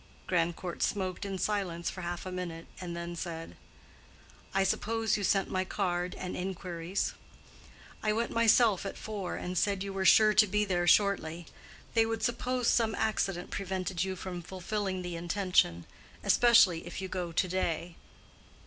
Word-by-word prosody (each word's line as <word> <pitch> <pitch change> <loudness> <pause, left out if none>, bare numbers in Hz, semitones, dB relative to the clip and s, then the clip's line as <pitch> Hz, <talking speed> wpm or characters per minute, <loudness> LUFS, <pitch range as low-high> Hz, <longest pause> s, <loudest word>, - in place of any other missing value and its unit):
Grandcourt 175 0 -1
smoked 190 0 -1
in 195 -1 -3
silence 185 -4 -1
for 185 - -7
half 175 +1 -4
a 185 - -5
minute, 170 -2 -5 0.2
and 170 -2 -5
then 170 0 -5
said, 165 -1 -6 1.0
"I 195 - +2
suppose 225 +3 0
you 205 - -2
sent 195 0 +2
my 185 0 +1
card 180 -2 -2
and 180 - -5
inquiries." 180 -1 -3 0.9
"I 215 - +1
went 230 +2 -1
myself 230 -3 +4
at 195 - -5
four, 205 -4 -4
and 180 +1 -4
said 195 +1 +1
you 200 -1 -5
were 195 0 -1
sure 215 +2 +7
to 210 0 +6
be 210 +2 +1
there 175 -3 0
shortly. 175 -4 +3 0.5
They 225 -1 +4
would 225 -1 -3
suppose 245 +1 0
some 225 -2 +3
accident 195 -5 -1
prevented 185 -2 -2
you 190 0 -3
from 180 -1 -6
fulfilling 190 +1 -3
the 175 -1 -4
intention. 170 - +1 0.4
Especially 200 -9 +5
if 175 - -6
you 190 - -4
go 180 -2 -3
to 185 +3 +1
day." 175 -2 -2
185 Hz, 160 wpm, -30 LUFS, 175-205 Hz, 1.0 s, sure